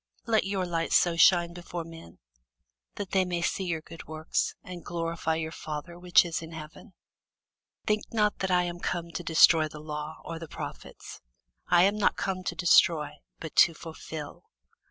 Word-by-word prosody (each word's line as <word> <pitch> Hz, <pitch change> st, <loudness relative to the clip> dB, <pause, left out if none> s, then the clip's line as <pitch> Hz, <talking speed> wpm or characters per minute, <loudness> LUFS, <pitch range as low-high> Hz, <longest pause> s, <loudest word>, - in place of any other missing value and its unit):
Let 220 Hz, -3 st, +2 dB
your 195 Hz, -1 st, -1 dB
light 165 Hz, -2 st, -2 dB
so 175 Hz, -2 st, +4 dB
shine 170 Hz, 0 st, +5 dB
before 175 Hz, -1 st, -6 dB
men, 165 Hz, -, -12 dB, 0.8 s
that 200 Hz, -2 st, -6 dB
they 190 Hz, -1 st, +3 dB
may 175 Hz, -2 st, -2 dB
see 190 Hz, -, -1 dB
your 165 Hz, -3 st, -2 dB
good 165 Hz, +1 st, -12 dB
works, 155 Hz, 0 st, -2 dB
and 180 Hz, -1 st, -9 dB
glorify 165 Hz, -1 st, -2 dB
your 160 Hz, 0 st, -3 dB
Father 160 Hz, +2 st, -7 dB
which 180 Hz, 0 st, +5 dB
is 165 Hz, -2 st, -3 dB
in 165 Hz, 0 st, -9 dB
heaven. 160 Hz, +6 st, -11 dB, 0.9 s
Think 210 Hz, 0 st, 0 dB
not 210 Hz, -2 st, +1 dB
that 190 Hz, -, -1 dB
I 180 Hz, -1 st, +3 dB
am 175 Hz, 0 st, -5 dB
come 170 Hz, -1 st, -3 dB
to 175 Hz, -, -5 dB
destroy 160 Hz, -1 st, +5 dB
the 155 Hz, -, -11 dB
law, 150 Hz, +1 st, -6 dB
or 165 Hz, -1 st, -6 dB
the 165 Hz, -, -8 dB
prophets: -, -, -9 dB, 0.5 s
I 175 Hz, 0 st, +5 dB
am 200 Hz, +2 st, +2 dB
not 205 Hz, -, +3 dB
come 190 Hz, -2 st, -2 dB
to -, -, -2 dB
destroy, 165 Hz, -4 st, +4 dB, 0.3 s
but 160 Hz, -, -8 dB
to 165 Hz, -, +6 dB
fulfil. 160 Hz, -2 st, -8 dB
170 Hz, 175 wpm, -28 LUFS, 160-180 Hz, 0.9 s, to